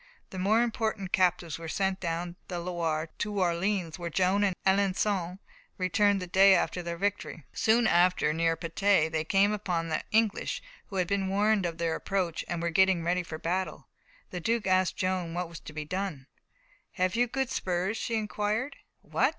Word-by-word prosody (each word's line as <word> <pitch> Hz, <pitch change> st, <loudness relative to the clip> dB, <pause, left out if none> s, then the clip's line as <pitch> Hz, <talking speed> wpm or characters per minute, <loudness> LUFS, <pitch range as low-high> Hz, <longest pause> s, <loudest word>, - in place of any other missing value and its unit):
The 185 Hz, -, -6 dB
more 215 Hz, +5 st, +3 dB
important 220 Hz, -5 st, -2 dB
captives 175 Hz, -3 st, +1 dB
were 165 Hz, -, -7 dB
sent 190 Hz, +3 st, -1 dB
down 170 Hz, 0 st, -3 dB
the 180 Hz, -, -4 dB
Loire 165 Hz, -2 st, -2 dB
to 205 Hz, -1 st, -2 dB
Orleans, 180 Hz, -1 st, 0 dB
where 170 Hz, -1 st, -3 dB
Joan 190 Hz, +4 st, +2 dB
and 195 Hz, -3 st, +1 dB
Alençon 190 Hz, -2 st, +1 dB, 0.4 s
returned 200 Hz, +2 st, +2 dB
the 180 Hz, -, -4 dB
day 190 Hz, +2 st, +6 dB
after 180 Hz, -, 0 dB
their 170 Hz, -1 st, -5 dB
victory. 195 Hz, -5 st, -3 dB
Soon 225 Hz, +2 st, +3 dB
after, 175 Hz, -5 st, +3 dB
near 165 Hz, 0 st, +1 dB
Patay 170 Hz, 0 st, +2 dB
they 160 Hz, -1 st, 0 dB
came 195 Hz, +5 st, +3 dB
upon 180 Hz, -5 st, -2 dB
the 155 Hz, -, -1 dB
English, 220 Hz, -1 st, +1 dB, 0.2 s
who 195 Hz, -, -9 dB
had 180 Hz, -2 st, +1 dB
been 195 Hz, 0 st, 0 dB
warned 205 Hz, -1 st, +2 dB
of 165 Hz, -1 st, -6 dB
their 165 Hz, -1 st, 0 dB
approach, 185 Hz, -2 st, -2 dB
and 170 Hz, -1 st, -3 dB
were 170 Hz, -, 0 dB
getting 190 Hz, 0 st, +3 dB
ready 180 Hz, +2 st, +1 dB
for 165 Hz, -2 st, -7 dB
battle. 185 Hz, +4 st, -3 dB, 0.4 s
The 180 Hz, -, -4 dB
Duke 225 Hz, +4 st, 0 dB
asked 185 Hz, -1 st, +2 dB
Joan 185 Hz, -3 st, -1 dB
what 180 Hz, 0 st, -2 dB
was 170 Hz, -, -9 dB
to -, -, -10 dB
be 155 Hz, 0 st, -5 dB
done. 185 Hz, -5 st, -4 dB, 0.7 s
"Have 185 Hz, +2 st, 0 dB
you 245 Hz, +1 st, +3 dB
good 265 Hz, +1 st, -2 dB
spurs?" 185 Hz, -3 st, -1 dB
she 230 Hz, +1 st, -2 dB
inquired. 215 Hz, +5 st, -2 dB, 0.3 s
"What!" -, -, +2 dB
185 Hz, 185 wpm, -29 LUFS, 170-200 Hz, 0.7 s, day